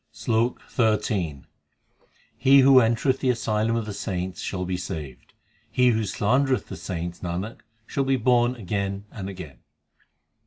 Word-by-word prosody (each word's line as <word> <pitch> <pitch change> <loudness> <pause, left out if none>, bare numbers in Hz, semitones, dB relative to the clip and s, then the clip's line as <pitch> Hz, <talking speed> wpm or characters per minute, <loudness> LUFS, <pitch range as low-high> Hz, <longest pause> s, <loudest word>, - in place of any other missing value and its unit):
SLOK 115 +2 -1
XIII 100 - 0 0.9
He 135 +1 +6
who 135 0 +7
entereth 120 +3 +2
the 130 - 0
asylum 110 -2 0
of 115 -2 -1
the 105 - -5
saints 95 -2 -4
shall 90 -1 -3
be 90 0 -2
saved; 80 -7 -7 0.4
He 125 -1 +4
who 110 -2 +1
slandereth 125 +3 +1
the - - -5
saints, 85 -2 -5
Nanak, 90 +5 -4 0.3
shall 140 - -1
be 135 0 +2
born 125 0 +2
again 100 -2 -3
and 95 -2 -6
again. 85 -10 -9
110 Hz, 145 wpm, -25 LUFS, 90-125 Hz, 0.9 s, who